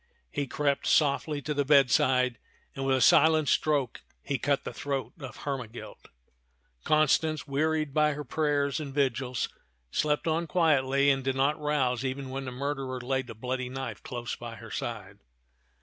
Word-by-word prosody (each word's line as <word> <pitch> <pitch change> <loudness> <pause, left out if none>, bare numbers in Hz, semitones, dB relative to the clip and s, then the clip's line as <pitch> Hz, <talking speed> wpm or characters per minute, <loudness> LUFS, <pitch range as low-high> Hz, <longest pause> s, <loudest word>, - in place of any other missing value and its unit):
He 145 -2 -2
crept 140 0 0
softly 145 0 +2
to 150 - -2
the 145 0 +1
bedside 130 -3 +3 0.4
and 135 - -4
with 135 -1 +3
a - - -1
silent 155 +4 +5
stroke 145 -6 +1 0.2
he 140 -3 -2
cut 140 +3 0
the - - -6
throat 140 -2 -3
of 130 -3 -9
Hermegild, 125 -5 -6 0.8
Constance, 155 0 +2
wearied 155 +1 0
by 150 0 +3
her 150 +1 -5
prayers 145 0 0
and 140 -3 -6
vigils, 130 -3 0 0.4
slept 150 +1 0
on 165 +1 0
quietly, 140 -5 +3
and 135 -1 0
did 135 0 -1
not 145 +3 +1
rouse 135 -5 0
even 130 0 -4
when 135 0 -4
the 130 - -5
murderer 135 0 -3
laid 130 +1 -2
the 115 - -8
bloody 125 +2 -3
knife 135 +1 -5
close 120 -3 -5
by 120 -1 -8
her 115 0 -11
side. 100 -4 -5
135 Hz, 165 wpm, -28 LUFS, 130-150 Hz, 0.8 s, silent